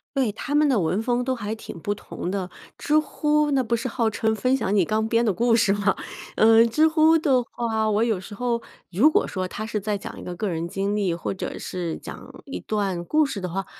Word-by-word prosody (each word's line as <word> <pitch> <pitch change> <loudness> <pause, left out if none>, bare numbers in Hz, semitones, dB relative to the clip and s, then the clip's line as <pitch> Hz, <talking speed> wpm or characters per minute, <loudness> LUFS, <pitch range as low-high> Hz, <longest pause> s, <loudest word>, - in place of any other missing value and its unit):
对， 260 -5 +1
他 285 +7 -4
们 300 0 +4
的 260 -6 +3
文 180 +3 0
风 245 +1 0
都 260 +1 -1
还 215 -3 -4
挺 220 - -9
不 205 +5 -1
同 185 -3 -6
的。 190 -2 -3 0.3
知 300 - +1
乎 300 -1 +1
那 270 -2 +2
不 235 0 0
是 235 +2 -3
号 230 -2 0
称 220 0 0
分 255 +5 +1
享 205 -5 -1
你 195 - +4
刚 220 +4 0
编 230 +1 +2
的 220 - +2
故 230 +5 +2
事 215 -3 +3
嘛。 200 -1 +1 0.4
嗯， 225 +1 +6
知 310 +7 +4
乎 320 0 +4
的 265 -5 +2
话， 225 -2 -2
我 215 +1 +2
有 225 -5 0
时 190 - -10
候 235 +2 -1 0.3
如 235 - +5
果 - - +2
说 185 -1 -3
他 215 - -6
是 215 -1 -2
在 210 +1 -2
讲 200 - -7
一 - - -9
个 180 - -6
个 205 +3 -2
人 165 -1 -2
经 195 +3 -2
历 195 -4 0
或 170 - -3
者 - - -5
是 175 -3 -4
讲 - - -10
一 275 - -6
段 195 -5 -2
故 305 - +3
事 220 - -4
的 185 - -3
话， 190 +2 -3
220 Hz, 260 characters per minute, -24 LUFS, 195-250 Hz, 0.4 s, 嗯